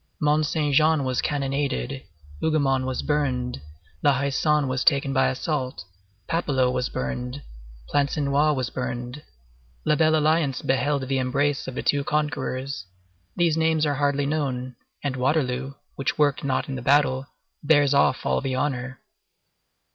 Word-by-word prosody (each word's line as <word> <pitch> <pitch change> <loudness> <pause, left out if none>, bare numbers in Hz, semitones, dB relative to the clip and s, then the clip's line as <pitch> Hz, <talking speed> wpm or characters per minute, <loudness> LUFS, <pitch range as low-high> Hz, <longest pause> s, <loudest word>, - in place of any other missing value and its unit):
Mont 150 +1 +2
Saint 150 -2 0
Jean 155 0 +4
was 130 -1 0
cannonaded, 140 -2 -2 0.4
Hougomont 135 -5 +1
was 130 - -2
burned, 130 - -1 0.4
La 145 -2 +3
Haie 140 +1 -1
Sainte 150 0 +2
was 130 0 -1
taken 140 -2 +3
by 135 - +3
assault, 130 - -2 0.4
Papelotte 135 -7 +1
was 125 0 -1
burned, 125 - -4 0.4
Plancenoit 145 +1 +1
was 130 -2 -2
burned, 125 +2 -4 0.6
La - - +3
Belle 155 0 +3
Alliance 155 -3 +1
beheld 135 +1 0
the 135 0 0
embrace 140 +2 0
of 130 - -6
the - - -3
two 145 -1 +2
conquerors; 140 -5 -2 0.5
these 170 -3 +2
names 160 -1 +2
are 145 - +1
hardly 145 0 +1
known, 130 -4 -2 0.3
and 140 -2 -1
Waterloo, 135 0 0 0.2
which 135 - -1
worked 145 -1 +2
not 135 +1 0
in 135 - -4
the 130 - -4
battle, 135 0 +2 0.4
bears 145 -2 +4
off 140 - +2
all - - +1
the 135 -2 -2
honor. 130 -1 -2
140 Hz, 145 wpm, -24 LUFS, 130-150 Hz, 0.6 s, Jean